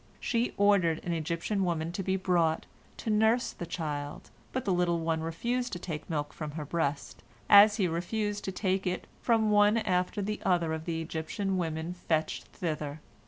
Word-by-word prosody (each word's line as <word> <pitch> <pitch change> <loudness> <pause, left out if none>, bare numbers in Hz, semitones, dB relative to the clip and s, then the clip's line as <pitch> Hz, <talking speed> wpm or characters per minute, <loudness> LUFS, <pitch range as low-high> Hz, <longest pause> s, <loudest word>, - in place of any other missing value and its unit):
She 235 +1 0
ordered 195 -6 +4
an 175 - -1
Egyptian 170 +5 -1
woman 165 -2 -1
to 180 - -3
be 190 0 0
brought, 175 -4 +1 0.3
to 220 - -2
nurse 220 +3 +3
the 175 - -7
child, 150 -4 -4 0.2
but 260 - -3
the 195 - +2
little 175 -1 +2
one 160 -1 0
refused 240 +10 -2
to - - -2
take 165 -3 -6
milk 145 -3 -2
from 155 -2 -5
her 155 -1 -5
breast, 145 -2 -2 0.3
as 205 +1 +8
he 195 -5 +2
refused 205 +5 -2
to 190 - -2
take 190 0 0
it 180 0 -2 0.2
from 225 -2 +3
one 205 +1 +5
after 185 -2 0
the 210 +2 -3
other 170 -3 +2
of 160 0 -4
the 165 -1 -2
Egyptian 165 +5 -2
women 165 -1 -2
fetched 160 -3 -1
thither. 155 -3 -4
175 Hz, 180 wpm, -30 LUFS, 160-205 Hz, 0.3 s, as